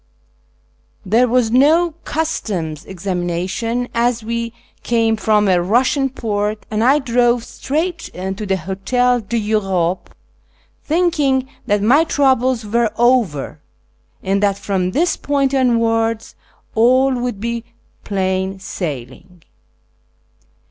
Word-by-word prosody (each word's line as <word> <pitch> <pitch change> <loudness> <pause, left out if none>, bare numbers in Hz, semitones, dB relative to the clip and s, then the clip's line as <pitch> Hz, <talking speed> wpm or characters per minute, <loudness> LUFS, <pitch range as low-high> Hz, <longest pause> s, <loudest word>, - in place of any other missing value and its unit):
There 230 +6 +3
w^as 240 -2 +2
no 315 +7 +4
customs' 190 - -3
examina 180 -2 -3
tion, 235 +5 -2
as 235 -1 +1
we 230 +1 -3 0.3
came 225 -1 +1
from 215 -1 +2
a 185 -2 +4
Eussiau 255 +8 +1
port, 210 -1 -2
and 215 +1 0
I 270 +4 +5
drove 245 -3 +2
straight 325 +8 -3
to 190 +3 -4
the 190 0 +1
Hotel 245 +8 0
d'Europe, 200 -5 -1 0.7
thinking 300 -6 +1 0.2
that 205 0 +1
my 270 +9 +5
troubles 260 -6 +1
were 230 +2 +1
over, 235 - +1 0.6
and 195 +1 0
that 200 -1 +2
from 190 -3 -1
this 325 - +1
point 280 -1 0
onwards 230 -3 +1 0.4
all 255 +4 +4
would 245 -4 -3
be 235 +1 -3 0.4
plain 190 -1 -1
sailing. 175 -1 -7
230 Hz, 110 wpm, -18 LUFS, 195-255 Hz, 0.7 s, I